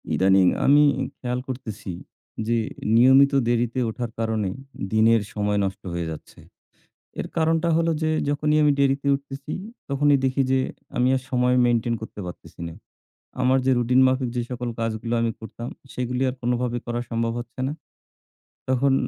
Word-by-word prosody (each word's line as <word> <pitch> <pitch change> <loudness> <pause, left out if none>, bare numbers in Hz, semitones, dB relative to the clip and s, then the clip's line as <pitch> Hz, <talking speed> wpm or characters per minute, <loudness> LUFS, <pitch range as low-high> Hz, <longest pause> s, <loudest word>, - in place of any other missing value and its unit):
ইদানিং 95 -1 +4 0.2
আমি 145 +2 +6 0.4
খেয়াল 125 0 -2
করতেছি 110 -7 -6 0.6
যে, 115 0 +2 0.4
নিয়মিত 130 +4 +6
দেরিতে 120 +1 +1
ওঠার 120 +1 -4
কারণে 110 -3 0 0.4
দিনের 110 +1 +4
সময় 105 -1 0
নষ্ট 95 +1 -5
হয়ে 85 -1 -2
যাচ্ছে। 80 - -10 0.8
এর - - -4
কারণটা 165 +1 +2
হলো 165 0 +2
যে 155 - +2 0.2
যখনই 150 +1 +1
আমি 150 -1 +5
দেরিতে 140 0 +2
উঠতেছি, 140 +1 -6 0.4
তখনই 145 +1 +3
দেখি 130 +1 +2
যে 130 - +4 0.4
আমি 125 +1 +3
আর 130 - -3
সময় 125 0 +2
maintain 120 0 +1
করতে 110 - -8
পারতেছি 90 - -10
না। 80 - -9 0.7
আমার 130 +1 +4
যে - - +4
রুটিন 125 +2 +3
মাফিক 130 -1 +1
যে 120 - +1
সকল 125 -1 -3
কাজগুলো 115 +1 -2
আমি 115 - +1
করতাম, 115 +2 -7 0.2
সেগুলী 125 +1 -2
আর 125 - -2
কোনোভাবে 120 0 0
করা 120 0 -2
সম্ভব 115 0 0
হচ্ছে 120 +2 -10
না। 145 - -3 1.0
তখন 130 +1 +3
125 Hz, 155 wpm, -24 LUFS, 115-135 Hz, 1.0 s, আমি